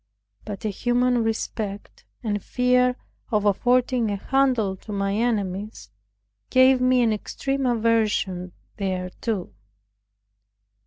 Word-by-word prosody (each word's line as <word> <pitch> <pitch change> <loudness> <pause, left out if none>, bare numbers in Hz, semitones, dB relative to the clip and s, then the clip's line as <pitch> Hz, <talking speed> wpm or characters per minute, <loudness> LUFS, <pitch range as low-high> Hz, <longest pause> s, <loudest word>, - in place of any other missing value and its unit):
But 205 0 -6
a - - +1
human 245 +3 +1
respect, 215 -2 -4 0.2
and 205 -3 -1
fear 250 0 +2 0.3
of 210 -3 +1
affording 245 +2 +2
a 205 - -1
handle 245 -3 +1
to 210 - -11
my 195 -1 -1
enemies, 205 - -2 0.6
gave 260 0 +5
me 255 -1 +4
an 225 -2 +2
extreme 270 +5 -2
aversion 215 -6 +1 0.3
thereto. 185 - -3
225 Hz, 105 wpm, -24 LUFS, 200-250 Hz, 0.6 s, gave